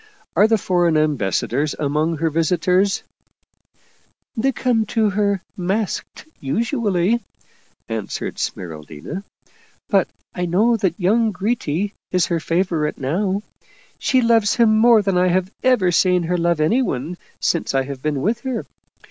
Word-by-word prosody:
Are 210 - +6
the 225 0 +3
foreign 175 -4 +2
ambassadors 145 0 0
among 155 +3 0
her 165 +1 0
visitors? 180 +4 +1 0.4
" - - -40
" - - -41
They 260 +4 +1
come 245 -3 +1
to 220 -2 +1
her 200 -1 0
masked, 195 +3 -3
usually," 220 - 0 0.6
answered 110 -2 -4
Smeral 80 -4 -4
dina. 145 - -7 0.3
" - - -34
But - - +3 0.3
I 180 -1 -2
know 215 +8 +3
that 190 -5 -1
young 220 +5 +2
Gritti 200 -2 -2 0.2
is 180 -2 +2
her 170 -1 -1
favorite 165 -2 -1
now; 190 +9 -1 0.6
she 260 -2 +2
loves 230 -3 +3
him 225 -2 +4
more 225 -1 +5
than 195 -2 +1
I 180 - +3
have 185 +1 +1
ever 245 -9 +3
seen 180 0 +3
her 175 +2 -1
love 170 -1 +1
anyone 160 - 0 0.2
since 170 -5 0
I 135 - +3
have 135 -1 -7
been 145 -2 -1
with 230 +3 +1
her. 255 -2 -4
180 Hz, 150 wpm, -20 LUFS, 160-215 Hz, 0.6 s, Are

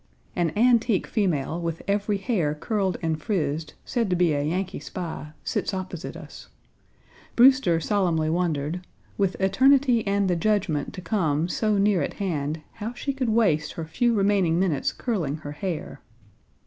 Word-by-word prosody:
An 175 -3 +1
antique 230 -2 +3
female, 170 - -1
with 165 -1 -4
every 205 +1 +1
hair 190 - 0
curled 190 +2 -1
and 160 -1 -1
frizzed, 155 -5 -2
said 235 -5 -1
to 180 - +2
be 175 -3 +3
a 145 - 0
Yankee 185 +6 -2
spy, 160 -4 -6
sits 195 - -2
opposite 185 -2 -6
us. - - -11 0.9
Brewster 255 -9 +5
solemnly 170 -4 +1
wondered 165 -1 -1 0.3
"with 195 -2 0
eternity 250 +5 +4
and 200 0 +2
the 180 - +2
judgment 170 -6 0
to 185 - -6
come 165 -4 0
so 210 +3 0
near 200 -3 +3
at - - -3
hand, 155 -5 -2 0.2
how 225 +3 -3
she 275 +3 -3
could 260 -3 -1
waste 185 -10 +2
her 165 - -5
few 235 +9 +1
remaining 195 -5 +2
minutes 175 -7 +1
curling 180 - -2
her 155 -2 -7
hair." 170 +2 -5
185 Hz, 155 wpm, -25 LUFS, 160-210 Hz, 0.9 s, Brewster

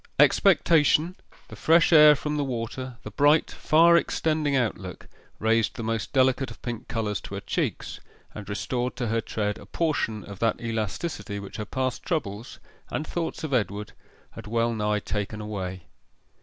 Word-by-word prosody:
Expectation, 170 -2 +4 0.3
the - - -9
fresh 165 +1 +4
air 150 -1 +9
from 150 +1 -3
the 145 - 0
water, 125 0 -5
the 105 - -7
bright, 145 +7 +3
far 170 +2 +4
extending 155 -3 +1
outlook, 100 -8 -2 0.3
raised 110 0 +1
the 115 - -5
most 115 0 -2
delicate 130 -1 +2
of 115 - -11
pink 120 -3 -5
colours 105 -4 -2
to - - -8
her - - -3
cheeks, - - -3 0.3
and 105 -2 -9
restored 125 +5 -2
to 120 -2 -2
her 115 +1 +1
tread 105 -1 -3
a 100 - -13
portion 130 -8 -1
of 100 -2 -10
that 115 -1 +1
elasticity 115 - -3
which 100 -1 -9
her 105 - -4
past 130 +3 -2
troubles, 120 - -4 0.3
and 155 - -3
thoughts 165 0 -4
of 155 -3 -3
Edward, 105 -3 -1 0.4
had 115 -2 -10
well 115 +1 +1
nigh 105 -1 0
taken 105 +1 -4
away. 95 -4 -5
115 Hz, 165 wpm, -26 LUFS, 105-150 Hz, 0.4 s, air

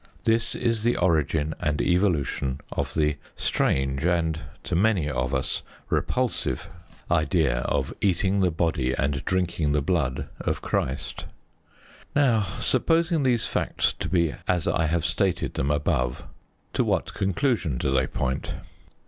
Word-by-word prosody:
This 115 0 +1
is 115 -3 0
the 120 +2 +2
origin 80 -3 +1
and 75 -1 0
evolution 80 -7 +1
of - - -3
the 75 -2 +2 0.2
strange 65 +1 0
and, 85 -2 +1 0.2
to 90 - -2
many 95 -4 +3
of 65 -3 -1
us, 65 -1 -1 0.3
repulsive 130 -1 0 0.4
idea 80 -5 +2
of - - -1
eating 95 0 +2
the 95 -2 +3
body 80 -6 0
and 70 0 -1
drinking 85 -5 0
the 75 - +2
blood 75 -6 0
of - - -1
Christ. 65 +1 -2 0.9
Now, 120 -8 +3
supposing 165 -1 +2
these 125 -4 +2
facts - - 0
to - - -3
be 85 -4 +2
as 90 -3 +1
I 80 -2 +2
have 85 +1 0
stated 95 -2 0
them 70 - -1
above, 75 -4 0 0.5
to - - +2
what - - 0
conclusion 95 - 0
do 65 - 0
they 65 -1 +2
point? 65 +1 -2
85 Hz, 140 wpm, -26 LUFS, 70-100 Hz, 0.9 s, many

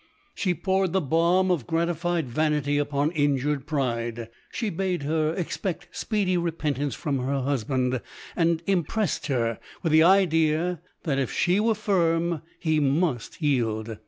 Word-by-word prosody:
She 180 -4 0
poured 190 -1 0
the 190 - +3
balm 170 +4 +2
of 155 -10 -1
gratified 170 -1 0
vanity 145 +2 +1
upon 145 +1 0
injured 145 -2 0
pride. 120 -5 -2 0.2
She 225 -4 -2
bade 180 -2 -1
her 155 +1 +1
expect 180 0 -3
speedy 200 -5 0
repentance 150 -5 -1
from 140 -3 -2
her 135 +2 -1
husband, 130 -1 0 0.3
and 165 -1 +1
im 190 -3 +2
pressed 210 +2 -2
her 115 -5 0 0.2
with 165 - +1
the 160 +1 +6
idea, 165 -2 +3 0.2
that 140 -4 0
if 135 - -1
she 180 +3 +2
were 225 +1 +2
firm, 170 -5 +1 0.2
he 155 -2 +1
must 145 -1 0
yield. 115 -6 0
155 Hz, 145 wpm, -26 LUFS, 140-175 Hz, 0.3 s, the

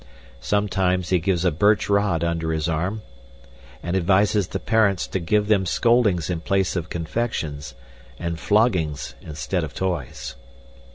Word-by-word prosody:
Sometimes 95 -3 0
he 90 - +3
gives 90 0 0
a 90 - +4
birch 100 +7 +2
rod 100 -5 +1
under 85 -1 -1
his 80 0 -1
arm 90 +7 -2 0.8
and 85 +2 -2
advises 100 +2 +2
the - - -4
parents 105 -5 +2
to 95 - -3
give 105 +4 +1
them 105 -3 +3
scoldings 110 -7 +2
in 85 -2 -2
place 95 +2 0
of 85 -2 -3
confections, 80 - -3 0.4
and 85 -1 -4
floggings 90 - +1
instead 80 +3 -3
of 75 - -6
toys. 90 -9 -3
90 Hz, 140 wpm, -23 LUFS, 80-100 Hz, 0.8 s, a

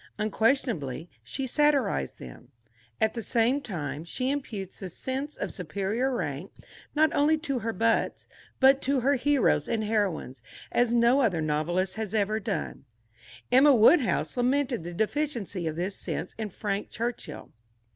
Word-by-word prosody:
Unquestionably, 215 - 0
she 270 - -4
satirized 270 - +1
them. 60 -2 -11 0.5
At 220 - +2
the 230 - -4
same 240 +5 +2
time, 150 - -5
she 255 +10 -2
imputes 215 -10 -5
the 190 - -6
sense 265 - -4
of - - -4
superior 200 - -2
rank 150 - -3 0.4
not 310 0 +3
only 305 +2 +3
to 275 -6 -1
her 225 0 -2
butts, 225 +2 0 0.3
but 270 +1 +6
to 270 -1 +1
her 275 +4 +3
heroes 285 0 +2
and 225 -1 0
heroines, 195 - -1 0.3
as 245 -1 +2
no 240 +3 +4
other 195 -10 +2
novelist 170 +6 -1
has 220 -1 -3
ever 215 +1 +1
done. 200 -9 -4 0.7
Emma 270 +2 +7
Woodhouse 240 +4 +4
lamented 250 -3 +1
the 175 +1 -7
deficiency 220 - -2
of 155 - -3
this 185 +4 -2
sense - - -4
in 220 -1 -4
Frank 200 +1 -3
Churchill. 235 +2 -5
225 Hz, 145 wpm, -27 LUFS, 185-265 Hz, 0.7 s, Emma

